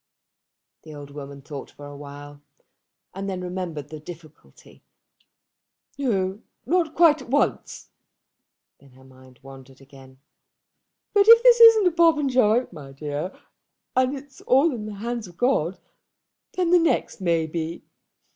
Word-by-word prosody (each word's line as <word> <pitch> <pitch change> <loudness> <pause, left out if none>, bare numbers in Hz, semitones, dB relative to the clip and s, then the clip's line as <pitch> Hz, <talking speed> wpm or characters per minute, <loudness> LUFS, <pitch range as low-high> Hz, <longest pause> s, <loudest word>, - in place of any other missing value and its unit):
The 155 -1 -12
old 145 -1 -11
woman 140 -1 -10
thought 140 -1 -9
for 145 - -13
a 145 0 -10
while, 145 0 -11 0.7
and 195 +1 -5
then 185 -1 -4
remembered 175 -5 -6
the 155 - -9
difficulty. 155 - -15 1.1
"No, 205 -7 -2 0.2
not 335 -2 0
quite 315 -3 +4
at 260 - -13
once." 285 +3 -2 0.9
Then 140 -2 -21
her 130 +1 -19
mind 130 -1 -19
wandered 135 -1 -14
again. 135 -1 -17 1.0
"But 405 0 +4
if 460 +1 +8
this 485 -1 +6
isn't 455 -3 +8
a 360 - +4
Popenjoy, 270 -9 +2
my 140 -3 -11
dear, 145 +5 -5 0.6
and 255 +2 +1
it's 275 0 -14
all 275 +4 +3
in 215 -3 -6
the 210 - -7
hands 230 +1 -5
of 175 -1 -17
God, 195 - 0 0.8
then 360 -2 -1
the 355 - +6
next 330 - -1
may 170 -3 +1
be. 165 +1 -5
180 Hz, 140 wpm, -23 LUFS, -, 1.1 s, if